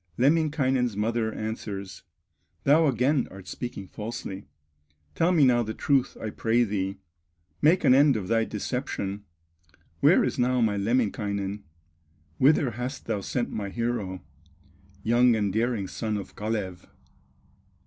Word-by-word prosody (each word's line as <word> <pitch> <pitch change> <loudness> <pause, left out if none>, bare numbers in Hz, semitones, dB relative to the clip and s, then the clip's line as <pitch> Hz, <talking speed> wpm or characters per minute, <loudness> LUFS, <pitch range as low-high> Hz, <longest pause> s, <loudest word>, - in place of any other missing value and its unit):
Lemminkainen's 135 -5 +2
mother 110 +1 0
answers: 100 -4 -5 0.6
"Thou 155 +3 +5
again 130 +2 +2
art 95 -1 -12
speaking 120 -5 -6
falsely; 105 -2 -6 0.7
Tell 170 +2 +2
me 160 -6 +5
now 120 -2 +4
the 110 -1 -4
truth 135 -3 +1
I 110 - -4
pray 115 +3 +2
thee, 100 -3 -2 0.6
Make 170 +5 +4
an - - +6
end 140 0 +5
of 100 -4 -3
thy 115 0 +2
deception, 105 -3 -4 0.7
Where - - +5
is - - -2
now 125 +1 +2
my 110 -3 +2
Lemminkainen, 100 -2 -1 0.8
Whither 140 -2 +4
hast 125 +4 -5
thou 110 -3 -2
sent 120 +4 -2
my 100 -2 -4
hero, 110 -4 -3 0.8
Young 120 +1 +4
and 105 -3 0
daring 110 -3 0
son 110 +3 -3
of 100 - -8
Kalew? 105 -4 -3
115 Hz, 130 wpm, -26 LUFS, 100-125 Hz, 0.8 s, an